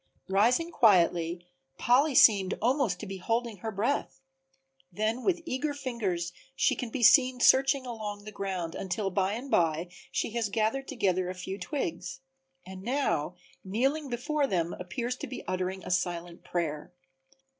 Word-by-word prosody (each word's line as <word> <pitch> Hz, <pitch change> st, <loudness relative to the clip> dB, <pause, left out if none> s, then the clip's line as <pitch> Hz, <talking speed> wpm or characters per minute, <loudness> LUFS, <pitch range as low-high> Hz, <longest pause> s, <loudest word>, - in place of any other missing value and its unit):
Rising 240 Hz, -, +3 dB
quietly, 175 Hz, -, +3 dB, 0.3 s
Polly 270 Hz, +4 st, +3 dB
seemed 200 Hz, -6 st, +6 dB
almost 245 Hz, -7 st, +1 dB
to -, -, -5 dB
be 195 Hz, 0 st, -6 dB
holding 230 Hz, +3 st, -2 dB
her 220 Hz, +4 st, -5 dB
breath. 230 Hz, +6 st, -1 dB, 0.7 s
Then 220 Hz, +4 st, -1 dB
with 350 Hz, -3 st, +1 dB
eager 290 Hz, 0 st, -2 dB
fingers 200 Hz, -11 st, -3 dB, 0.2 s
she -, -, +2 dB
can 245 Hz, -, -4 dB
be 245 Hz, +1 st, -3 dB
seen 255 Hz, +1 st, +6 dB
searching 270 Hz, +2 st, +4 dB
along 210 Hz, -4 st, -6 dB
the 215 Hz, -, -8 dB
ground 190 Hz, -5 st, -4 dB
until 195 Hz, +1 st, -2 dB
by 195 Hz, +1 st, +1 dB
and 250 Hz, +5 st, -6 dB
by 165 Hz, 0 st, +2 dB, 0.2 s
she -, -, -1 dB
has 230 Hz, -2 st, -1 dB
gathered 225 Hz, +6 st, 0 dB
together 185 Hz, -8 st, 0 dB
a 185 Hz, -, -5 dB
few 190 Hz, +2 st, -6 dB
twigs, 180 Hz, -, -4 dB, 0.4 s
and 190 Hz, 0 st, -9 dB
now 220 Hz, -, -1 dB, 0.3 s
kneeling 270 Hz, +9 st, 0 dB
before 280 Hz, +4 st, 0 dB
them 175 Hz, -5 st, -1 dB
appears 235 Hz, +8 st, -3 dB
to -, -, -6 dB
be 255 Hz, -, -7 dB
uttering 185 Hz, +1 st, -2 dB
a -, -, -5 dB
silent 175 Hz, -1 st, -2 dB
prayer. 155 Hz, -4 st, -3 dB
210 Hz, 155 wpm, -29 LUFS, 180-255 Hz, 0.7 s, seemed